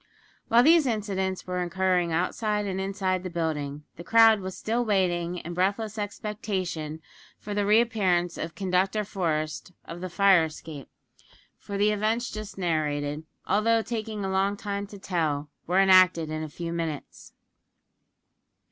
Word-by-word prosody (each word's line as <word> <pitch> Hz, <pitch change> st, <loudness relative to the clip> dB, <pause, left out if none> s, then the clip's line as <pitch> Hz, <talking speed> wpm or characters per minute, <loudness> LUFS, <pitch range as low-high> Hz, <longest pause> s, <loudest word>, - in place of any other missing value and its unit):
While 235 Hz, +2 st, +5 dB
these 320 Hz, 0 st, +5 dB
incidents 195 Hz, -4 st, -2 dB
were 180 Hz, 0 st, -2 dB
occurring 180 Hz, -1 st, +1 dB
outside 210 Hz, +5 st, 0 dB
and 190 Hz, -1 st, -2 dB
inside 190 Hz, -1 st, -1 dB
the 185 Hz, -, -5 dB
building, 150 Hz, -4 st, -3 dB
the 170 Hz, -, -8 dB
crowd 225 Hz, +2 st, +6 dB
was 185 Hz, -1 st, -6 dB
still 235 Hz, +3 st, -1 dB
waiting 180 Hz, -5 st, 0 dB
in 175 Hz, 0 st, -6 dB
breathless 205 Hz, +4 st, -1 dB
expectation 190 Hz, -7 st, -4 dB, 0.3 s
for 205 Hz, -, -6 dB
the 205 Hz, 0 st, 0 dB
re 215 Hz, +2 st, +6 dB
appearance 185 Hz, -7 st, +1 dB
of 165 Hz, +1 st, -5 dB
Conductor 195 Hz, +2 st, 0 dB
Forest 165 Hz, -3 st, -2 dB
of 170 Hz, +1 st, -8 dB
the 185 Hz, -, -4 dB
fire 190 Hz, -2 st, +5 dB
escape; 155 Hz, -2 st, -9 dB, 0.7 s
for 200 Hz, -, -6 dB
the 205 Hz, +1 st, +3 dB
events 220 Hz, +3 st, 0 dB
just 215 Hz, -1 st, -7 dB
narrated, 150 Hz, -3 st, -1 dB, 0.2 s
although 225 Hz, +3 st, +2 dB
taking 220 Hz, -3 st, -4 dB
a 190 Hz, -, -2 dB
long 195 Hz, +1 st, +1 dB
time 200 Hz, -1 st, -4 dB
to 205 Hz, -, -11 dB
tell, 155 Hz, -6 st, -2 dB, 0.2 s
were 180 Hz, +3 st, +3 dB
enacted 185 Hz, -4 st, +5 dB
in 155 Hz, 0 st, -3 dB
a 155 Hz, -, -5 dB
few 170 Hz, +2 st, -5 dB
minutes. 165 Hz, -4 st, -5 dB
190 Hz, 150 wpm, -27 LUFS, 170-210 Hz, 0.7 s, crowd